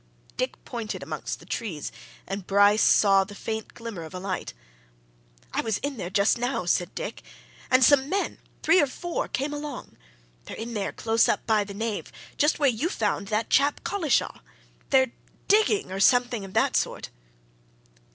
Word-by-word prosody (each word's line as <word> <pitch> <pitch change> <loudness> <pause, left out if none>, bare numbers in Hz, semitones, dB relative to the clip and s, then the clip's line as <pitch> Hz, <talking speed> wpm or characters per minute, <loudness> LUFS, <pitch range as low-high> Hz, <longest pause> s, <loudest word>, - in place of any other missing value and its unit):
Dick 255 +1 -2
pointed 230 -4 -5
amongst - - -5
the - - -15
trees, 175 -11 -4 0.3
and 195 -1 -5
Bryce 205 +2 +5
saw 195 -2 +5
the 205 +1 -11
faint 220 +1 -5
glimmer 230 -7 -7
of 160 +2 -9
a - - -4
light. 185 - -4 1.0
"I - - +1
was 220 -3 -1
in 280 -1 -4
there 180 -4 -4
just 200 +4 +2
now," 245 -5 -1
said 175 0 0
Dick. - - -5 0.5
"And 255 0 +5
some 275 +1 +5
men 395 +3 -1 0.2
three 370 - +5
or 290 - +2
four 345 +6 -4
came 280 +3 -2
along. 290 -3 -7 0.5
They're - - -8
in 230 +1 -5
there, 205 -3 -2
close 225 0 +2
up - - 0
by 215 -2 +3
the 200 0 -9
nave, 220 0 -3 0.2
just 295 +2 +2
where 290 - +3
you 245 +9 -1
found 205 - -1
that 215 +2 -1
chap 285 +1 +3
Collishaw. 330 - 0 0.5
They're 260 -2 +4 0.4
digging 420 - +3
or 190 - -3
something 245 0 +3
of 190 - -11
that - - +2
sort!" - - -1
225 Hz, 170 wpm, -26 LUFS, 200-275 Hz, 1.0 s, Bryce